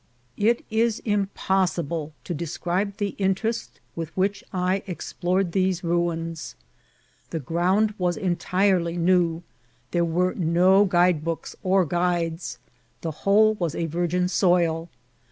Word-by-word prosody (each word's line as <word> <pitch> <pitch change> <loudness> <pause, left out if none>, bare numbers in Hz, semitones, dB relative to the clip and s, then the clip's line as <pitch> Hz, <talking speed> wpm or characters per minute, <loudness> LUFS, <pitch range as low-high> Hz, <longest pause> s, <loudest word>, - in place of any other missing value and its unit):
It 230 +3 +2
is 225 0 +2
impossible 190 -6 0
to 175 - -4
describe 175 +5 -2
the 205 -2 -1
interest 200 +4 -1 0.2
with 165 -2 -4
which 195 +2 0
I 185 +1 0
explored 180 0 -1
these 185 -1 0
ruins. 165 - -2 0.7
The 165 - -3
ground 185 +8 +1
was 175 -1 0
entirely 180 -2 +1
new; 175 -1 +2 0.5
there 175 -1 +2
were 175 +2 +1
no 180 +4 +4
guide 175 -4 +3
books 165 0 -4
or 190 0 +3
guides; 175 0 -1 0.4
the 165 - -3
whole 205 +7 +3
was 175 -7 -3
a 170 - -1
virgin 175 +2 0
soil. 175 -3 +2
180 Hz, 120 wpm, -24 LUFS, 170-195 Hz, 0.7 s, no